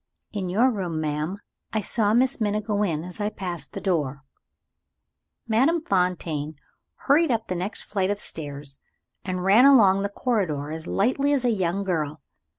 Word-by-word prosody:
"In 195 Hz, -4 st, -3 dB
your 235 Hz, +8 st, +3 dB
room, 180 Hz, -7 st, -3 dB
madam. 155 Hz, +4 st, -2 dB, 0.4 s
I 215 Hz, -, +1 dB
saw 215 Hz, 0 st, +1 dB
Miss 255 Hz, 0 st, +2 dB
Minna 210 Hz, 0 st, +1 dB
go 210 Hz, -1 st, -2 dB
in 165 Hz, -6 st, 0 dB
as 180 Hz, +4 st, -7 dB
I 205 Hz, -, 0 dB
passed 175 Hz, -8 st, -5 dB
the -, -, -4 dB
door." 145 Hz, -7 st, -1 dB, 1.2 s
Madame 265 Hz, +10 st, +3 dB
Fontaine 170 Hz, -, -1 dB, 0.5 s
hurried 310 Hz, +3 st, +4 dB
up 225 Hz, -2 st, 0 dB
the 185 Hz, -, -3 dB
next 180 Hz, +4 st, -3 dB
flight 195 Hz, -2 st, -1 dB
of 205 Hz, 0 st, -1 dB
stairs, 145 Hz, -5 st, -5 dB, 0.4 s
and 185 Hz, -1 st, -3 dB
ran 205 Hz, +7 st, +6 dB
along 205 Hz, -9 st, +6 dB
the 200 Hz, -, -1 dB
corridor 185 Hz, -, -1 dB
as 160 Hz, +1 st, -6 dB
lightly 275 Hz, +7 st, +1 dB
as 265 Hz, -3 st, 0 dB
a 240 Hz, -, +3 dB
young 190 Hz, -2 st, 0 dB
girl. 155 Hz, -5 st, -2 dB
195 Hz, 165 wpm, -25 LUFS, 160-220 Hz, 1.2 s, ran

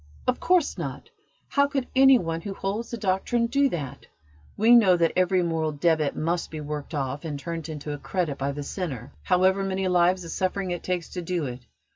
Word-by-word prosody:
"Of 250 Hz, -, 0 dB
course 360 Hz, -4 st, +2 dB
not! -, -, -6 dB, 0.4 s
How 280 Hz, 0 st, +3 dB
could 275 Hz, -3 st, -2 dB
any 270 Hz, 0 st, +7 dB
one 165 Hz, -5 st, -3 dB
who 195 Hz, 0 st, -6 dB
holds 205 Hz, +5 st, -3 dB
the 235 Hz, -, -4 dB
Doctrine 210 Hz, +4 st, 0 dB
do 275 Hz, +3 st, +2 dB
that? 140 Hz, -, -6 dB, 0.5 s
We 225 Hz, +3 st, +5 dB
know 190 Hz, -6 st, +6 dB
that 165 Hz, -1 st, +2 dB
every 185 Hz, 0 st, +3 dB
moral 160 Hz, -2 st, -1 dB
debit 155 Hz, -1 st, +1 dB
must 170 Hz, +2 st, -1 dB
be 155 Hz, -, -6 dB
worked 150 Hz, +1 st, -5 dB
off 140 Hz, 0 st, -3 dB
and 150 Hz, -3 st, -4 dB
turned 165 Hz, +2 st, -5 dB
into 150 Hz, -1 st, -5 dB
a 145 Hz, -, -6 dB
credit 170 Hz, -6 st, -2 dB
by 140 Hz, +1 st, -1 dB
the 145 Hz, +1 st, -5 dB
sinner, 140 Hz, -, -5 dB
however 190 Hz, +1 st, +3 dB
many 190 Hz, 0 st, -1 dB
lives 180 Hz, 0 st, +3 dB
of 165 Hz, -, -7 dB
suffering 185 Hz, 0 st, -1 dB
it 175 Hz, -, -3 dB
takes 180 Hz, -2 st, -3 dB
to 180 Hz, -, -5 dB
do 175 Hz, -2 st, -2 dB
it. 125 Hz, -1 st, -7 dB
175 Hz, 205 wpm, -26 LUFS, 155-195 Hz, 0.5 s, any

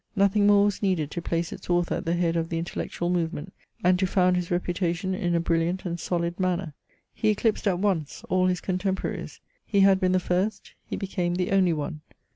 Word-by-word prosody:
Nothing 200 Hz, +1 st, +3 dB
more 205 Hz, 0 st, +6 dB
was 205 Hz, -2 st, -1 dB
needed 180 Hz, -7 st, 0 dB
to 170 Hz, -, -4 dB
place 165 Hz, 0 st, -2 dB
its 195 Hz, -2 st, -11 dB
author 175 Hz, 0 st, +2 dB
at -, -, -6 dB
the 165 Hz, +1 st, +1 dB
head 170 Hz, -1 st, +1 dB
of 165 Hz, 0 st, -1 dB
the 165 Hz, -, -2 dB
intellectual 175 Hz, +1 st, -3 dB
movement, 170 Hz, 0 st, -2 dB, 0.3 s
and 180 Hz, 0 st, +4 dB
to 190 Hz, -, +2 dB
found 180 Hz, -1 st, +3 dB
his 180 Hz, -1 st, -2 dB
reputation 175 Hz, +1 st, -1 dB
in 175 Hz, -2 st, 0 dB
a -, -, +3 dB
brilliant 170 Hz, +3 st, 0 dB
and 175 Hz, -1 st, -3 dB
solid 170 Hz, +1 st, -2 dB
manner. 180 Hz, -3 st, -1 dB, 0.4 s
He 215 Hz, -, +1 dB
eclipsed 215 Hz, 0 st, +1 dB
at 185 Hz, -3 st, +2 dB
once 180 Hz, -6 st, -1 dB
all 185 Hz, 0 st, +2 dB
his 180 Hz, -1 st, 0 dB
contemporaries. 190 Hz, 0 st, -3 dB, 0.2 s
He 200 Hz, -2 st, +2 dB
had 195 Hz, -1 st, +6 dB
been 185 Hz, -1 st, +2 dB
the 185 Hz, -, +4 dB
first; 185 Hz, +4 st, -2 dB
he -, -, -3 dB
became 180 Hz, -3 st, -2 dB
the 180 Hz, +1 st, -1 dB
only 190 Hz, -3 st, +4 dB
one. 155 Hz, 0 st, -4 dB
180 Hz, 210 wpm, -26 LUFS, 170-190 Hz, 0.4 s, more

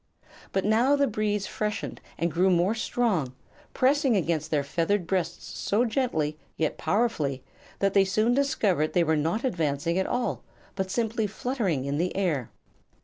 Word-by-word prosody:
But 195 Hz, -, 0 dB
now 235 Hz, +7 st, +4 dB
the 285 Hz, 0 st, +3 dB
breeze 210 Hz, -4 st, -1 dB
freshened 210 Hz, -1 st, -3 dB, 0.2 s
and 170 Hz, 0 st, 0 dB
grew 180 Hz, +5 st, +3 dB
more 180 Hz, +3 st, +3 dB
strong, 205 Hz, -, 0 dB, 0.4 s
pressing 270 Hz, -3 st, +3 dB
against 160 Hz, -3 st, -1 dB
their 150 Hz, -3 st, +1 dB
feathered 170 Hz, +6 st, 0 dB
breasts 175 Hz, -1 st, -2 dB
so 220 Hz, +5 st, +2 dB
gently 160 Hz, -, -1 dB, 0.2 s
yet 155 Hz, -2 st, 0 dB
powerfully 160 Hz, -, 0 dB, 0.3 s
that 195 Hz, -1 st, +1 dB
they 195 Hz, -, +6 dB
soon 215 Hz, +5 st, +2 dB
discovered 205 Hz, -, +1 dB
they 175 Hz, -, +4 dB
were 160 Hz, -1 st, +2 dB
not 165 Hz, +9 st, 0 dB
advancing 165 Hz, -, 0 dB
at 190 Hz, -, 0 dB
all, 245 Hz, 0 st, -1 dB, 0.3 s
but 190 Hz, -1 st, -3 dB
simply 225 Hz, +1 st, 0 dB
fluttering 205 Hz, -, -2 dB
in 140 Hz, +1 st, -1 dB
the 180 Hz, +2 st, -1 dB
air. 160 Hz, -, 0 dB
190 Hz, 155 wpm, -27 LUFS, 160-225 Hz, 0.4 s, they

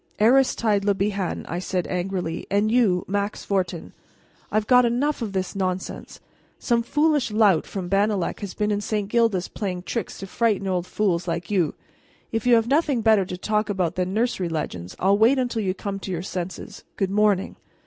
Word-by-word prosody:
'" -, -, -29 dB
"Aristide 230 Hz, -6 st, +3 dB
Le 200 Hz, 0 st, +2 dB
Bihan," 195 Hz, -2 st, -2 dB
I 175 Hz, -, -3 dB
said 180 Hz, -1 st, -2 dB
angrily, 180 Hz, -2 st, -3 dB
"and 205 Hz, +2 st, +2 dB
you, 215 Hz, -7 st, +3 dB
Max 200 Hz, +1 st, -2 dB
Fortin, 180 Hz, -4 st, -2 dB, 0.6 s
I've 215 Hz, 0 st, +1 dB
got 250 Hz, +2 st, +6 dB
enough 250 Hz, +5 st, 0 dB
of 215 Hz, -4 st, -3 dB
this 190 Hz, 0 st, -2 dB
nonsense! 185 Hz, -1 st, -4 dB, 0.4 s
Some 235 Hz, -2 st, +1 dB
foolish 295 Hz, +2 st, +1 dB
lout 210 Hz, -6 st, +3 dB
from 190 Hz, -3 st, -5 dB
Bannalec 200 Hz, -1 st, 0 dB
has 200 Hz, -3 st, -6 dB
been 210 Hz, 0 st, 0 dB
in 205 Hz, 0 st, 0 dB
St. 210 Hz, -1 st, -2 dB
Gildas 220 Hz, -5 st, +1 dB
playing 185 Hz, -4 st, -4 dB
tricks 230 Hz, +2 st, -4 dB
to 195 Hz, -, -6 dB
frighten 210 Hz, 0 st, 0 dB
old 180 Hz, -1 st, -1 dB
fools 180 Hz, -4 st, 0 dB
like 170 Hz, +3 st, -3 dB
you. 180 Hz, -6 st, +1 dB, 0.6 s
If 225 Hz, +1 st, -2 dB
you 245 Hz, -, +7 dB
have 225 Hz, 0 st, +2 dB
nothing 280 Hz, -2 st, +2 dB
better 215 Hz, -3 st, +4 dB
to 180 Hz, -, -6 dB
talk 210 Hz, +3 st, -1 dB
about 185 Hz, -4 st, 0 dB
than 185 Hz, 0 st, -2 dB
nursery 215 Hz, -4 st, 0 dB
legends 90 Hz, -, -4 dB
I'll 195 Hz, +2 st, +2 dB
wait 235 Hz, +5 st, +5 dB
until 245 Hz, -3 st, -1 dB
you 190 Hz, -2 st, -1 dB
come 200 Hz, 0 st, -4 dB
to 195 Hz, -, -7 dB
your 175 Hz, -1 st, -3 dB
senses. 185 Hz, -1 st, -6 dB
Good 195 Hz, -1 st, -1 dB
morning." 205 Hz, -2 st, +1 dB
200 Hz, 190 wpm, -24 LUFS, 185-225 Hz, 0.6 s, you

